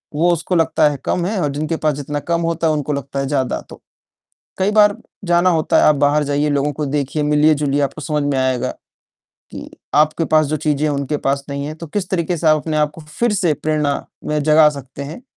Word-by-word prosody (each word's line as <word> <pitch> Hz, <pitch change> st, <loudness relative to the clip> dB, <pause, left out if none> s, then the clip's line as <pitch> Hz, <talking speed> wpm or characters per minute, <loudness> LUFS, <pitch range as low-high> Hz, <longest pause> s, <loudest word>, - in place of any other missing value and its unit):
वो 175 Hz, +3 st, +3 dB
उसको 175 Hz, +2 st, -2 dB
लगता 160 Hz, -2 st, +3 dB
है 145 Hz, -, -4 dB
कम 175 Hz, -, 0 dB
है 205 Hz, +1 st, -1 dB
और 150 Hz, -, 0 dB
जिनके 155 Hz, +3 st, -2 dB
पास 155 Hz, -2 st, 0 dB
जितना 145 Hz, +1 st, -4 dB
कम 170 Hz, -, +1 dB
होता 165 Hz, 0 st, 0 dB
है, 155 Hz, -, +2 dB
उनको 150 Hz, 0 st, -2 dB
लगता 140 Hz, 0 st, -4 dB
है 135 Hz, -, -1 dB
ज़्यादा 135 Hz, -3 st, -1 dB
तो, -, -, -12 dB, 0.8 s
कई 190 Hz, +2 st, +2 dB
बार 210 Hz, -1 st, +4 dB, 0.3 s
जाना 175 Hz, 0 st, +3 dB
होता 160 Hz, -3 st, +1 dB
है, -, -, +4 dB
आप 150 Hz, -, +5 dB
बाहर 145 Hz, +1 st, +2 dB
जाइए, 145 Hz, +1 st, 0 dB
लोगों 145 Hz, +1 st, 0 dB
को 150 Hz, +1 st, -3 dB
देखिए, 145 Hz, +1 st, -2 dB
मिलिए-जुलिए, 150 Hz, -1 st, +2 dB
आपको 140 Hz, +3 st, -3 dB
समझ 150 Hz, +1 st, -1 dB
में 145 Hz, -1 st, 0 dB
आएगा 130 Hz, -1 st, 0 dB, 0.8 s
कि -, -, -9 dB, 0.2 s
आपके 155 Hz, +2 st, +3 dB
पास 155 Hz, -1 st, +3 dB
जो 155 Hz, +2 st, -1 dB
चीज़ें 150 Hz, -1 st, -1 dB
हैं, 145 Hz, -, -1 dB
उनके 140 Hz, +1 st, -2 dB
पास 140 Hz, 0 st, 0 dB
नहीं 140 Hz, 0 st, -4 dB
है, 155 Hz, -, -5 dB
तो 165 Hz, +1 st, -9 dB
किस 185 Hz, +4 st, -3 dB
तरीके 175 Hz, -1 st, -1 dB
से 165 Hz, -, -3 dB
आप 155 Hz, -, +5 dB
अपने 155 Hz, 0 st, -3 dB
आप 150 Hz, -1 st, +2 dB
को -, -, -11 dB
फिर 160 Hz, +10 st, -2 dB
से 175 Hz, -6 st, +1 dB
प्रेरणा 150 Hz, -2 st, 0 dB, 0.3 s
में 150 Hz, -, 0 dB
जगा 155 Hz, 0 st, +6 dB
सकते 135 Hz, +1 st, -9 dB
हैं। 155 Hz, -, -8 dB
150 Hz, 230 wpm, -18 LUFS, 145-165 Hz, 0.8 s, जगा